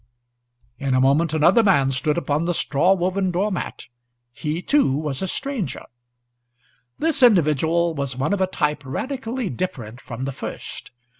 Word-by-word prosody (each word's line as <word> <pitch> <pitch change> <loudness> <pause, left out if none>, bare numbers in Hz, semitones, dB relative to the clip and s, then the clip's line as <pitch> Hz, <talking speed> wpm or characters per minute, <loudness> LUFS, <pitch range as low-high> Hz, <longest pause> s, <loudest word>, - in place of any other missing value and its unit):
In 135 -2 0
a - - +3
moment 140 +5 +3
another 160 +8 +4
man 160 -11 +3
stood 135 +4 0
upon 155 -1 0
the 175 0 0
straw 175 +8 +2
woven 185 +1 0
door 190 +4 0
mat. 180 - -5 0.5
He 150 +4 -3
too 285 - +3
was 145 -1 -2
a 190 - -1
stranger. 260 0 -3 1.1
This 320 -3 +1
individual 170 - +3
was 140 -4 -3
one 140 +9 0
of 200 - -1
a 190 - +3
type 150 -4 -1
radically 245 - -4
different 125 -6 -5
from 125 +2 -6
the 135 - -2
first. - - -7
165 Hz, 155 wpm, -22 LUFS, 140-190 Hz, 1.1 s, another